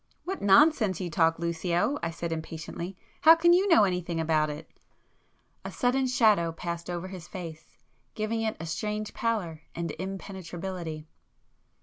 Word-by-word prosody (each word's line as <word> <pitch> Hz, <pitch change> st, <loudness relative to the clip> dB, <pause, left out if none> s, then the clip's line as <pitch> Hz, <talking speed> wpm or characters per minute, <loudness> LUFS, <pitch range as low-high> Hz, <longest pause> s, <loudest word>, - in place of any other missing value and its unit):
"What 380 Hz, +2 st, -4 dB
nonsense 210 Hz, -, +5 dB
you 180 Hz, -3 st, -4 dB
talk, 165 Hz, -2 st, +3 dB
Lucio!" 170 Hz, -, 0 dB
I 170 Hz, -, -1 dB
said 165 Hz, 0 st, -5 dB
impatiently—"How 170 Hz, -, +1 dB
can 345 Hz, +1 st, +5 dB
you 375 Hz, +3 st, +4 dB
know 330 Hz, -, +6 dB
anything 180 Hz, -3 st, -1 dB
about 155 Hz, -1 st, +2 dB
it!" 150 Hz, +2 st, -7 dB, 1.0 s
A -, -, -6 dB
sudden 255 Hz, +1 st, +1 dB
shadow 215 Hz, -9 st, +3 dB
passed 170 Hz, +1 st, -5 dB
over 175 Hz, +1 st, -4 dB
his 180 Hz, -3 st, -9 dB
face, 160 Hz, -4 st, -9 dB, 0.4 s
giving 220 Hz, +1 st, -1 dB
it 220 Hz, -1 st, -2 dB
a 165 Hz, -, -5 dB
strange 210 Hz, +5 st, -3 dB
pallor 195 Hz, -9 st, -2 dB
and 170 Hz, -1 st, -3 dB
impenetrability. 185 Hz, -4 st, -6 dB
180 Hz, 140 wpm, -28 LUFS, 165-215 Hz, 1.0 s, know